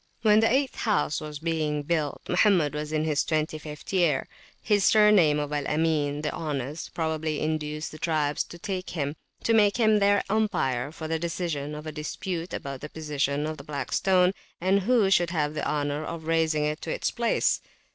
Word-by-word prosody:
When 215 Hz, -1 st, +6 dB
the 225 Hz, +1 st, +3 dB
eighth 270 Hz, +1 st, +1 dB
house 210 Hz, -9 st, 0 dB
was 150 Hz, -1 st, -6 dB
being 155 Hz, -2 st, -1 dB
built 150 Hz, -2 st, -1 dB
Mohammed 180 Hz, -6 st, +3 dB
was 150 Hz, 0 st, -4 dB
in 155 Hz, 0 st, 0 dB
his 155 Hz, -2 st, +1 dB
twenty 155 Hz, -1 st, -1 dB
fifth 150 Hz, +4 st, -9 dB
year. 170 Hz, -8 st, +2 dB, 0.3 s
His 205 Hz, -2 st, +2 dB
surname 210 Hz, -9 st, +5 dB
of 145 Hz, 0 st, -3 dB
Al 145 Hz, -2 st, -1 dB
Amin, 150 Hz, -2 st, 0 dB
the 150 Hz, -, -1 dB
Honest, 150 Hz, -1 st, -4 dB
probably 160 Hz, -2 st, -1 dB
induced 155 Hz, 0 st, -2 dB
the 155 Hz, -, -10 dB
tribes 150 Hz, -3 st, 0 dB
to 170 Hz, -5 st, -4 dB, 0.4 s
make 210 Hz, -1 st, +4 dB
him 215 Hz, -3 st, +4 dB
their 200 Hz, 0 st, +3 dB
umpire 170 Hz, -, 0 dB
for 160 Hz, 0 st, -7 dB
the 160 Hz, 0 st, -1 dB
decision 160 Hz, -3 st, -3 dB
of 150 Hz, +1 st, -8 dB
a 155 Hz, -, -4 dB
dispute 165 Hz, +3 st, -4 dB
about 135 Hz, -1 st, -5 dB
the 150 Hz, -, -6 dB
position 150 Hz, -2 st, -1 dB
of 155 Hz, 0 st, -4 dB
the 140 Hz, -, -10 dB
Black 140 Hz, -2 st, -5 dB
Stone, 185 Hz, -1 st, +3 dB, 0.3 s
and 190 Hz, +3 st, +3 dB
who 210 Hz, -1 st, +3 dB
should 175 Hz, -2 st, +4 dB
have 150 Hz, -3 st, -1 dB
the 155 Hz, -, -2 dB
honour 145 Hz, 0 st, -1 dB
of 165 Hz, 0 st, -6 dB
raising 160 Hz, -2 st, +1 dB
it 150 Hz, +1 st, -2 dB
to -, -, -6 dB
its -, -, -1 dB
place. 235 Hz, -1 st, +1 dB
155 Hz, 185 wpm, -27 LUFS, 150-185 Hz, 0.4 s, When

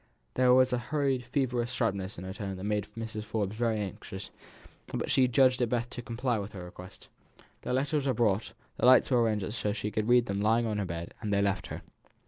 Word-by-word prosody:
There 125 Hz, 0 st, +4 dB
was 130 Hz, 0 st, +5 dB
a 125 Hz, -, +1 dB
hurried 135 Hz, -2 st, -1 dB
feverish 125 Hz, -2 st, -1 dB
sharpness 100 Hz, -3 st, -1 dB
in 90 Hz, -, -7 dB
her 95 Hz, 0 st, -5 dB
tone 100 Hz, -2 st, -5 dB
that 95 Hz, -, -7 dB
made 105 Hz, 0 st, -1 dB
Mrs. 110 Hz, -1 st, -4 dB
Forbes 105 Hz, -1 st, -2 dB
very 115 Hz, -1 st, +1 dB
anxious, 95 Hz, -1 st, -6 dB, 0.6 s
but -, -, -3 dB
she 130 Hz, -1 st, +5 dB
judged 130 Hz, 0 st, +4 dB
it 120 Hz, -, +2 dB
best 120 Hz, 0 st, -1 dB
to 120 Hz, -, -6 dB
comply 120 Hz, 0 st, -1 dB
with 105 Hz, +2 st, -6 dB
her 90 Hz, -3 st, -7 dB
requests. 90 Hz, +2 st, -12 dB, 0.5 s
The -, -, -4 dB
letters 140 Hz, +2 st, 0 dB
were 130 Hz, -, +2 dB
brought, 110 Hz, -3 st, +1 dB, 0.2 s
the -, -, +3 dB
lights 130 Hz, +1 st, +6 dB
were 125 Hz, -2 st, +4 dB
arranged 105 Hz, -3 st, 0 dB
so 115 Hz, -, -3 dB
that 105 Hz, -, +1 dB
she 105 Hz, -1 st, -3 dB
could 110 Hz, +2 st, -1 dB
read 120 Hz, -1 st, +5 dB
them 100 Hz, -2 st, -2 dB
lying 115 Hz, +3 st, +3 dB
on 105 Hz, -2 st, -1 dB
her 100 Hz, -, -1 dB
bed; 85 Hz, -1 st, -5 dB
and 105 Hz, -2 st, -3 dB
they 100 Hz, 0 st, +3 dB
left 100 Hz, -1 st, 0 dB
her. -, -, -7 dB
115 Hz, 230 wpm, -30 LUFS, 100-125 Hz, 0.6 s, lights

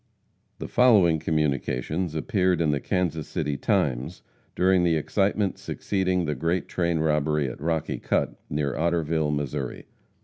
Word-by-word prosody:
The -, -, -6 dB
following 100 Hz, -10 st, +4 dB
communications 75 Hz, +2 st, -1 dB
appeared 90 Hz, +1 st, +1 dB
in 80 Hz, -3 st, +2 dB
the 70 Hz, -, 0 dB
Kansas 85 Hz, -5 st, -1 dB
City 75 Hz, -1 st, -2 dB
Times 70 Hz, +4 st, -1 dB, 0.3 s
during 95 Hz, 0 st, +3 dB
the 85 Hz, -2 st, +3 dB
excitement 100 Hz, +4 st, 0 dB
succeeding 95 Hz, -3 st, -1 dB
the 75 Hz, -, -1 dB
great 85 Hz, +6 st, -1 dB
train 85 Hz, -2 st, 0 dB
robbery 75 Hz, -2 st, +1 dB
at 65 Hz, +1 st, -7 dB
Rocky 80 Hz, 0 st, -1 dB
Cut, -, -, 0 dB, 0.2 s
near 75 Hz, -2 st, -1 dB
Otterville, 80 Hz, -2 st, 0 dB
Missouri. 75 Hz, -3 st, -3 dB
80 Hz, 135 wpm, -25 LUFS, 75-90 Hz, 0.3 s, following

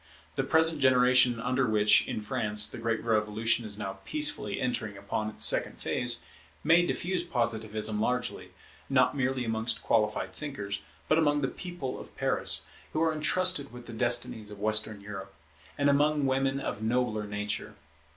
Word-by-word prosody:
The -, -, -1 dB
present 160 Hz, -1 st, +2 dB
generation 125 Hz, -2 st, +5 dB
under 125 Hz, +2 st, 0 dB
which, 105 Hz, -1 st, +4 dB
in -, -, -3 dB
France, 105 Hz, -3 st, +1 dB
the -, -, -7 dB
great 115 Hz, 0 st, -1 dB
revolution 110 Hz, +1 st, +1 dB
is 105 Hz, -1 st, -4 dB
now 95 Hz, -2 st, -5 dB
peacefully 300 Hz, -1 st, 0 dB
entering 110 Hz, -5 st, -2 dB
upon 105 Hz, +2 st, -3 dB
its 110 Hz, -, +1 dB
second -, -, +1 dB
phase, 120 Hz, -1 st, 0 dB, 0.4 s
may 165 Hz, +3 st, +5 dB
diffuse 175 Hz, 0 st, -2 dB
Positivism 110 Hz, -6 st, -1 dB
largely, 125 Hz, +2 st, -2 dB, 0.4 s
not -, -, +3 dB
merely 130 Hz, -2 st, -1 dB
amongst 110 Hz, +1 st, -1 dB
qualified 105 Hz, -2 st, 0 dB
thinkers, 105 Hz, -, -5 dB, 0.3 s
but 155 Hz, -, +3 dB
among 145 Hz, -2 st, +2 dB
the 135 Hz, -, +1 dB
people 175 Hz, -7 st, -6 dB
of -, -, -13 dB
Paris, -, -, +2 dB, 0.3 s
who 155 Hz, -, 0 dB
are 160 Hz, -1 st, +2 dB
entrusted 155 Hz, -1 st, +1 dB
with 120 Hz, 0 st, -11 dB
the 120 Hz, -, -9 dB
destinies 120 Hz, -2 st, 0 dB
of 105 Hz, -1 st, -10 dB
Western 110 Hz, 0 st, +1 dB
Europe, 95 Hz, -1 st, -8 dB, 0.4 s
and 145 Hz, -, +2 dB
among 145 Hz, +1 st, +3 dB
women 135 Hz, +1 st, +1 dB
of 105 Hz, -6 st, -4 dB
nobler 110 Hz, -2 st, 0 dB
nature. 105 Hz, 0 st, -4 dB
120 Hz, 160 wpm, -29 LUFS, 105-140 Hz, 0.4 s, generation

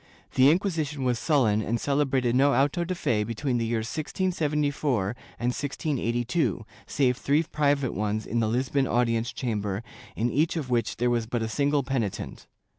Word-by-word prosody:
The 130 Hz, +1 st, +6 dB
Inquisition 155 Hz, -5 st, 0 dB
was 125 Hz, -2 st, +1 dB
sullen 115 Hz, -9 st, +2 dB
and 115 Hz, +3 st, -1 dB
celebrated 135 Hz, -3 st, +1 dB
no 140 Hz, +1 st, +4 dB
auto 140 Hz, +6 st, +2 dB
de 180 Hz, +2 st, -3 dB
fe 120 Hz, -10 st, 0 dB
between 120 Hz, +3 st, -2 dB
the 115 Hz, -, -1 dB
years 110 Hz, -1 st, -1 dB
1674 150 Hz, -, -1 dB, 0.3 s
and 120 Hz, -, 0 dB
1682, 125 Hz, -, -1 dB, 0.2 s
save 125 Hz, -3 st, +1 dB
three 145 Hz, +4 st, +2 dB
private 145 Hz, -4 st, 0 dB
ones 105 Hz, +2 st, -2 dB
in 120 Hz, -, -1 dB
the 110 Hz, -, +1 dB
Lisbon 130 Hz, +4 st, +1 dB
audience 115 Hz, -1 st, +1 dB
chamber, 105 Hz, -4 st, -3 dB, 0.3 s
in 115 Hz, +3 st, 0 dB
each 155 Hz, +6 st, +1 dB
of 135 Hz, -5 st, -4 dB
which 120 Hz, -1 st, 0 dB
there 120 Hz, +1 st, +1 dB
was 115 Hz, -2 st, 0 dB
but 120 Hz, -1 st, -1 dB
a -, -, -1 dB
single 140 Hz, +4 st, +1 dB
penitent. 125 Hz, -7 st, -3 dB
130 Hz, 165 wpm, -26 LUFS, 115-145 Hz, 0.3 s, The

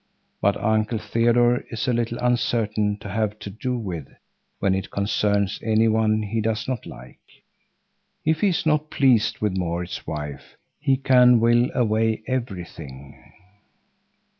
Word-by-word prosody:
But 100 Hz, 0 st, +2 dB
Uncle 110 Hz, +1 st, 0 dB
Theodore 120 Hz, +2 st, +2 dB
is 115 Hz, +2 st, -3 dB
a 125 Hz, -, +2 dB
little 120 Hz, 0 st, -1 dB
uncertain 110 Hz, -4 st, +1 dB
to -, -, -7 dB
have 105 Hz, +1 st, -1 dB
to 100 Hz, -, -8 dB
do 125 Hz, +5 st, -3 dB
with 90 Hz, -, -5 dB, 0.5 s
when 95 Hz, -1 st, +1 dB
it 95 Hz, 0 st, -3 dB
concerns 100 Hz, 0 st, 0 dB
any 110 Hz, 0 st, +2 dB
one 110 Hz, -1 st, +2 dB
he 110 Hz, +2 st, -2 dB
does 110 Hz, 0 st, -2 dB
not 130 Hz, -3 st, -4 dB
like. 65 Hz, -, -12 dB, 1.1 s
If 160 Hz, 0 st, +1 dB
he 210 Hz, -, +4 dB
is 180 Hz, -4 st, 0 dB
not 155 Hz, -1 st, +1 dB
pleased 125 Hz, -7 st, +2 dB
with 105 Hz, -3 st, 0 dB
Maurits's 90 Hz, -1 st, -3 dB
wife, 75 Hz, -3 st, -6 dB, 0.2 s
he 135 Hz, -2 st, +2 dB
can 125 Hz, -2 st, +5 dB
will 120 Hz, +2 st, +3 dB
away 110 Hz, -2 st, +1 dB
everything. 90 Hz, -, -6 dB
110 Hz, 140 wpm, -23 LUFS, 100-120 Hz, 1.1 s, can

